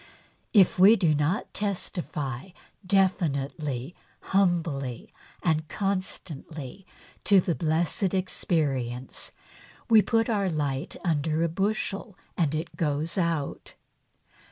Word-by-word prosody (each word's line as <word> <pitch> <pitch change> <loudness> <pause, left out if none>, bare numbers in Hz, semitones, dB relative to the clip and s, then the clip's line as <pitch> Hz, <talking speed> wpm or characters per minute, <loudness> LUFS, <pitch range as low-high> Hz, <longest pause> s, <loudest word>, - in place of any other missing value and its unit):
If 195 -5 +5
we 200 +5 +9
do 170 -7 +3
not 150 +9 0
testify 175 -7 -3 0.3
definitely, 155 -7 0 0.4
humbly 165 -10 0 0.3
and 160 -2 +1
constantly 180 -4 -4 0.4
to 200 -2 +6
the 175 -1 0
blessed 170 +4 +1
experience, 135 -9 -1 0.6
we 220 -1 +9
put 225 +1 +1
our 205 -5 +1
light 145 -2 -2
under 160 0 +1
a - - +3
bushel 195 +2 -2 0.2
and 155 -3 +1
it 160 +2 -4
goes 155 +1 0
out. 170 -6 -2
170 Hz, 100 wpm, -27 LUFS, 145-190 Hz, 0.6 s, we